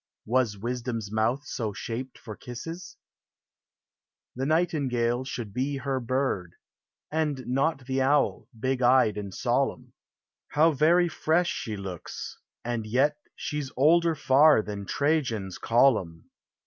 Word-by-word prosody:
Was 120 -3 +1
Wisdom's 115 -1 -4
mouth 115 +6 0
so 110 -6 -3
shaped 120 +5 -5
for 110 -3 -9
kisses: 165 - -8 1.4
The 135 +2 -2
Nightingale 130 -7 +1
should 120 -5 -5
he 135 +2 -1
her 135 0 -2
bird, 125 -8 -2 0.6
And 150 -4 -1
not 135 +2 0
the 135 +1 0
Owl, 140 +2 +2
hig 130 +2 -1
eyed 125 -4 +4
and 100 -2 -5
solemn. - - -1 0.6
How 160 +3 +5
very 165 +4 +4
fresh 170 +1 +1
she 110 -3 -4
looks, 95 -4 -7 0.3
and 115 -2 -2
yet 135 +7 +2 0.2
She's 150 -3 -4
older 165 +4 +4
far 145 -3 +5
than 100 -2 -6
Trajan's 130 - 0
column 115 -10 +2
130 Hz, 120 wpm, -27 LUFS, 115-145 Hz, 1.4 s, How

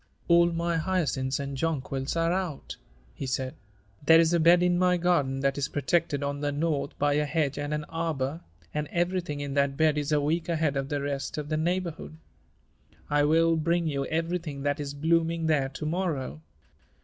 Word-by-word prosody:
"All 170 0 +5
my 170 0 -1
hyacinths 155 -6 0
and 140 0 -4
jonquils 135 -2 -2
are 165 +1 +2
out," 180 -6 -3 0.4
he 135 - -5
said. 130 0 -2 0.5
"There 160 +3 +7
is 165 0 +3
a 170 - +3
bed 170 +2 +6
in 175 0 +2
my 180 -1 +3
garden 145 -7 +1
that 135 +1 0
is 140 - 0
protected 150 0 0
on 140 0 -2
the 145 -1 0
north 145 -1 -2
by 145 0 +2
a 150 +1 +1
hedge 145 -2 -1
and 145 0 -3
an 150 0 -1
arbor, 160 -2 -3 0.3
and 150 0 -2
everything 175 -4 -1
in 140 -1 -4
that 140 -1 +1
bed 155 -2 +3
is 145 +1 -3
a 150 - +4
week 160 +4 -1
ahead 160 -4 +1
of 135 0 -2
the 145 -1 -1
rest 140 0 -3
of 150 -1 -4
the 155 - 0
neighborhood. 170 -1 -2 0.9
I 145 0 +3
will 165 +2 +4
bring 170 +2 +1
you 140 -3 -1
everything 165 -3 -2
that 145 0 0
is 145 -1 -4
blooming 165 +2 +1
there 145 -4 +2
to 145 +3 -6
morrow. 155 - -2
155 Hz, 190 wpm, -27 LUFS, 140-170 Hz, 0.9 s, There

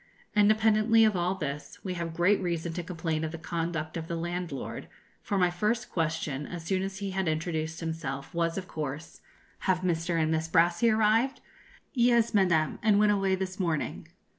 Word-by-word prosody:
Independently 215 +1 +5
of 215 -2 +2
all 180 +1 0
this, 150 -5 -5
we 185 - -3
have 170 -2 -4
great 190 +5 +3
reason 170 -2 -2
to 175 - -3
complain 165 -2 -3
of 160 - -2
the 165 - -6
conduct 165 -1 -3
of 165 -1 -4
the 170 - -3
landlord, 175 -3 -4 0.3
for 200 - -2
my 180 -2 +3
first 215 +7 -1
question, 155 -4 -2
as 175 -2 -6
soon 185 +2 0
as 190 0 -4
he 200 0 -4
had 190 -1 -1
introduced 160 0 -2
himself, 155 -3 -4
was, 170 0 0
of 185 -1 -4
course, 155 +1 -6 0.4
'Have 185 -1 +1
Mr. 170 -1 0
and 160 0 +1
Miss 160 0 0
Brassey 170 +7 +3
arrived?' 220 +4 +3 0.5
'Yes, 235 -3 +3
Madame, 175 -6 +2
and 215 -3 +4
went 210 0 +5
away 195 -2 +2
this 190 +1 -4
morning.' 165 -5 -2
175 Hz, 180 wpm, -29 LUFS, 160-195 Hz, 0.5 s, Independently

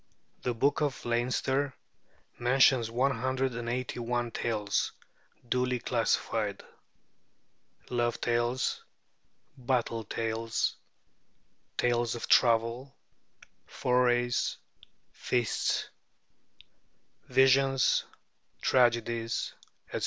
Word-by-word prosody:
'The 125 -1 -2
Book 140 +6 +1
of 145 -3 -2
Leinster' 130 +3 0 0.6
mentions 125 -1 +4
one 125 +4 +1
hundred 130 +1 0
and 115 0 -4
eighty 125 0 -3
one 120 0 -2
tales, 105 -3 -1 0.5
duly 125 +1 +1
classified: - - -1 1.3
Love 120 -1 0
tales, 120 +2 0 0.7
Battle 120 -3 -1
tales, 115 +1 -2 1.0
Tales 120 -1 +1
of 120 - -5
Travel, 115 +3 +3 0.7
Forays, 120 -1 +1 0.5
Feasts, 120 -3 -1 1.4
Visions, 135 +1 +4 0.5
Tragedies, 115 -2 +1 0.4
etc. - - -3
120 Hz, 75 wpm, -29 LUFS, 115-130 Hz, 1.4 s, mentions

